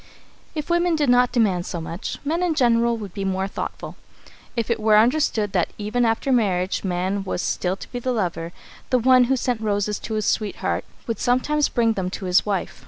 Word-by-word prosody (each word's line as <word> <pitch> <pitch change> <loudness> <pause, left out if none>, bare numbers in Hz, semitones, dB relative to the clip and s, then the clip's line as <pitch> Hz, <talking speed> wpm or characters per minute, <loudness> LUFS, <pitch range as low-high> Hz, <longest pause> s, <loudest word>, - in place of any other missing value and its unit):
If 305 +2 -3
women 345 0 +2
did 295 -4 +1
not 245 0 +4
demand 200 -8 +1
so 175 - -4
much, 165 +2 -5
men 325 +4 0
in 350 -3 +1
general 235 -3 +3
would 205 -5 -8
be 195 - -4
more 190 0 -1
thoughtful. - - -6 0.6
If 230 -1 -1
it 230 - 0
were 215 -1 +4
understood 225 -3 +2
that 180 -3 +1
even 215 +4 0
after 225 +4 0
marriage 190 -6 +1
man 190 +1 -1
was 185 - -3
still 180 +1 -1
to - - -11
be 245 - -4
the 255 +1 -1
lover, 175 -7 -2 0.4
the 255 - +3
one 255 +1 +5
who 265 +2 +2
sent 245 -3 -1
roses 210 -1 -1
to 220 - -5
his 215 -1 -1
sweetheart 210 -2 -1 0.2
would 230 - -3
sometimes 285 +5 +1
bring 230 -2 +2
them 190 -3 -2
to 190 - -6
his 180 +3 +3
wife. 195 -3 -2
220 Hz, 205 wpm, -23 LUFS, 195-250 Hz, 0.6 s, one